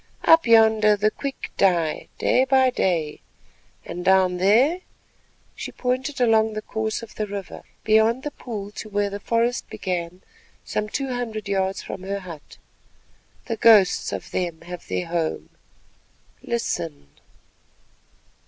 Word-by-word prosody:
"Up 325 -4 +6
yonder 220 -2 +5
the 210 +1 +1
quick 275 +3 -6
die 170 -5 +1
day 255 - +3
by 265 -1 +3
day 165 -9 -1 0.6
and 175 - -6
down 185 -1 +3
there"—and 240 - +3 0.7
she - - -7
pointed 260 +3 -2
along 220 -2 +3
the 215 - -4
course 220 +1 -3
of 225 - -11
the 215 - -3
river 200 -2 -7 0.2
beyond 220 +4 +3
the 295 - -4
pool 210 -7 -7
to 215 +1 -8
where 205 -1 -1
the 200 - -5
forest 235 +3 0
began 180 -1 -4 0.4
some 210 0 -2
two 270 +2 -3
hundred 220 -4 -4
yards 195 -1 -1
from - - -7
her 200 +1 -4
hut—"the 185 - -12
ghosts 215 -6 +5
of - - -6
them 175 -3 -3
have 175 +1 -9
their 180 - -2
home. 165 -1 -3 0.9
Listen!" 170 - -3
210 Hz, 135 wpm, -23 LUFS, 185-230 Hz, 0.9 s, Up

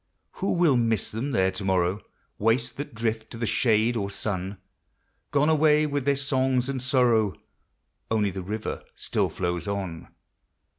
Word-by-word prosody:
Who 195 - +1
will 170 -7 +4
miss 115 -3 +1
them 115 +6 -3
there 95 -7 +2
to 95 +1 -5
morrow, 95 +1 +1 0.4
Waifs 115 +4 +2
that 145 -4 -7
drift 110 0 -2
to - - -8
the 115 - -1
shade 110 +1 +2
or 100 -3 -1
sun? 100 -1 -3 0.7
Gone 145 +1 +2
away 155 -1 +4
with 145 -3 -2
their 140 0 +3
songs 130 -2 +1
and 135 -2 -2
sorrow; 120 - +3 0.7
Only 105 -3 +1
the 95 - -5
river 105 +4 -4
still - - 0
flows 90 -1 -2
on. 95 -5 -4
115 Hz, 155 wpm, -26 LUFS, 100-135 Hz, 0.7 s, will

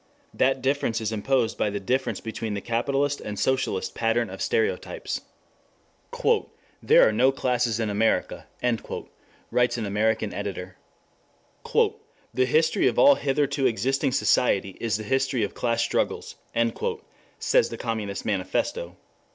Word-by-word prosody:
That 135 0 +1
difference 130 -4 0
is 110 -1 -2
imposed 115 +1 0
by 105 - +2
the 100 0 -3
difference 130 +7 -1
between 110 -1 -4
the - - -2
capitalist 135 +6 0
and 105 -1 -6
socialist 130 -7 0
pattern 115 +1 0
of - - -8
stereotypes. 455 0 -1 1.6
"There - - +6
are - - +2
no 135 - +4
classes 125 -4 0
in 115 - 0
America," 105 +2 0 1.0
writes 125 0 +2
an 115 - -2
American 110 +1 0
editor. 95 -2 -5 0.9
"The 130 - -1
history 160 +8 +3
of - - 0
all 285 - +8
hitherto 140 - +1
existing 130 +4 0
society 100 -8 +2
is 115 -3 0
the 110 - -6
history 130 0 0
of 100 - -3
class 115 -1 0
struggles," - - -1 1.0
says - - +2
the - - -6
Communist 110 -4 -3
Manifesto. 95 -2 -2
120 Hz, 130 wpm, -25 LUFS, 105-135 Hz, 1.6 s, all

